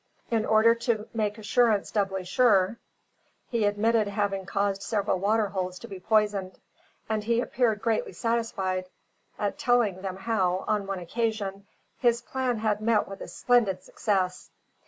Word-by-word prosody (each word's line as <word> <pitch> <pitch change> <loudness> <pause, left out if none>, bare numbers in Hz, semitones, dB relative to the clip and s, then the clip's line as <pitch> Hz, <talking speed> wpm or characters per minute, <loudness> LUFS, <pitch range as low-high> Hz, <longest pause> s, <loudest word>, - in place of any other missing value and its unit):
In 225 -2 +1
order 220 +1 +5
to 230 -2 -2
make 210 -2 -1
assurance 220 -1 +2
doubly 195 -3 -1
sure, 205 0 +3 0.7
he 230 -4 +1
admitted 215 +1 +2
having 200 -2 -2
caused 200 0 0
several 200 -3 0
water 210 +2 +2
holes 185 -2 -3
to 235 - -10
be 195 -4 -8
poisoned; 205 -2 +1 0.5
and 220 -1 -1
he 230 +2 +1
appeared 235 -4 0
greatly 225 -2 0
satisfied 195 -6 -1 0.5
at 205 -1 -2
telling 230 -7 +2
them 190 -1 -4
how, 190 -3 0
on 205 -2 0
one 195 -1 -2
occasion, 200 +1 -3 0.3
his 240 -2 +3
plan 250 0 -2
had 215 -1 0
met 220 -1 +2
with 195 - -9
a - - -6
splendid 220 -7 +1
success. 185 -3 -1
210 Hz, 150 wpm, -27 LUFS, 195-230 Hz, 0.7 s, order